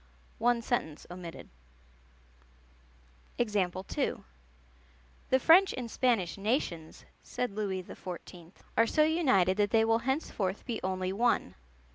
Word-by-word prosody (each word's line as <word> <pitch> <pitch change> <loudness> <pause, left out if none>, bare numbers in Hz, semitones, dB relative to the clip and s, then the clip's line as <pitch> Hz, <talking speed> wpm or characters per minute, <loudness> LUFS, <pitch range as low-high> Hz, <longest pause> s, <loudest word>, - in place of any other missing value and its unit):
(One 240 0 +2
sentence 160 -11 -2
omitted.) 175 -2 -8 1.9
"The 195 -5 -1 1.2
French 355 +8 +6
and 240 -3 -5
Spanish 220 -8 +1
nations," 195 - -2 0.2
said 250 -2 -3
Louis 195 -3 -3
XIV., 175 -1 -9 0.2
"are 230 +1 +4
so 305 - +3
united 260 - +3
that 205 -1 +2
they 225 0 +4
will 225 0 +3
henceforth 235 - -2
be 235 -3 -3
only 185 0 -1
one.... 230 - +1
210 Hz, 105 wpm, -30 LUFS, 185-245 Hz, 1.9 s, French